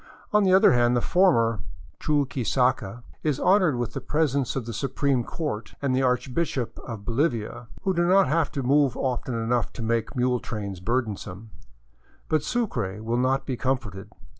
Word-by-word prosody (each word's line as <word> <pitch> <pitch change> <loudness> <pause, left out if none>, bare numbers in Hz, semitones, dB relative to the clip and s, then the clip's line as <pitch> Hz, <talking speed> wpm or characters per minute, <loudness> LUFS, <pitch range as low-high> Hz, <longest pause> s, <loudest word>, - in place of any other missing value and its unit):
On 210 0 +5
the 190 - +3
other 190 -6 +6
hand 120 0 +3
the - - +3
former 115 - +3 0.2
" - - -23
Chuquisaca 130 -5 0
" - - -32
is 140 - -4
honored 185 -7 +4
with 120 -1 -3
the - - -4
presence 140 -4 0
of 130 -4 -2
the 115 - -5
su 135 +6 -2
preme 135 -1 0
court 115 -8 -5
and 135 -2 0
the 130 - +2
archbishop 130 +1 -1
of 110 -4 -8
Bolivia, 120 -2 -1 0.2
who 190 - +1
do 175 0 +1
not 195 +2 +5
have 160 +2 +1
to 135 - -2
move 140 0 +3
often 125 -1 -2
enough 115 0 0
to 115 - -6
make 115 +3 -1
mule 125 0 +1
trails 100 -6 -5
burdensome. 110 -1 -3 0.8
But 155 -1 +2
Sucre 120 - -2
will 115 +2 0
not 130 +2 +1
be 130 - -2
comforted. 115 -7 -3
125 Hz, 180 wpm, -25 LUFS, 115-145 Hz, 0.8 s, other